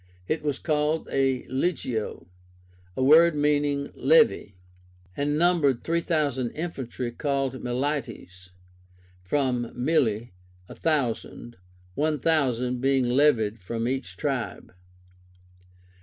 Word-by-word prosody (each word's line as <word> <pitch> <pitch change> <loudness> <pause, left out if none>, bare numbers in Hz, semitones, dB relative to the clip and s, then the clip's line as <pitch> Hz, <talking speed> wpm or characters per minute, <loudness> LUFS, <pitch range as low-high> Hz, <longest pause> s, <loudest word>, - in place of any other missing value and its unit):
It 155 - -1
was 145 -3 -2
called 155 0 0
a 135 -2 +1
Legio 130 - -2 0.7
(a 130 - +1
word 160 +4 +6
meaning 145 -1 0
levy), 460 - +3 0.6
and 145 +1 0
numbered 160 -7 +2
three 170 +1 0
thousand 145 -7 0
infantry 130 -7 -4
called 135 0 -1
milites, 120 -8 -4 0.7
from 125 +3 -1
mille, 120 -4 +1 0.4
a - - -10
thousand, 125 -5 -2 0.4
one 155 +7 0
thousand 125 -5 0
being 135 -2 +2
levied 120 -5 +2
from 115 +5 -3
each 125 -9 -4
tribe. - - -3
135 Hz, 100 wpm, -26 LUFS, 120-150 Hz, 0.7 s, word